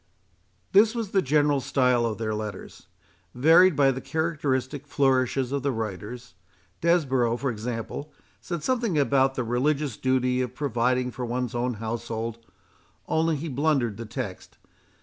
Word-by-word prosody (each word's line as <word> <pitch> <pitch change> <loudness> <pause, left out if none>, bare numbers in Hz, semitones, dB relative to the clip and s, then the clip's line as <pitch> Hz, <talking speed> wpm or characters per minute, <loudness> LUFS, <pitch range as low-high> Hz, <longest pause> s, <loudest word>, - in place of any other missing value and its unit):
This 215 +4 +5
was 225 -4 -3
the 195 - +3
general 145 -1 +2
style 125 -3 +2
of 110 - -3
their 110 -1 -2
letters, 105 -3 -7 0.5
varied 165 +6 +6
by 135 -1 +4
the 130 0 -5
characteristic 145 -4 -2
flourishes 130 -2 +1
of 140 0 -1
the 140 +1 0
writers. 110 +2 -6 0.5
Desborough, 135 -9 +2
for 135 0 -1
example, 115 +6 -5 0.3
said 170 -4 -5
something 235 -9 0
about 135 -2 +3
the 125 - -1
religious 135 +2 0
duty 130 -1 +1
of 125 -1 -4
providing 125 -2 0
for 125 - -6
one's 125 0 -2
own 120 0 -1
household, 115 +1 -4 0.7
only 160 0 +1
he 150 +3 -4
blundered 135 -6 0
the 115 -1 -7
text. 105 -4 -6
130 Hz, 145 wpm, -26 LUFS, 120-150 Hz, 0.7 s, varied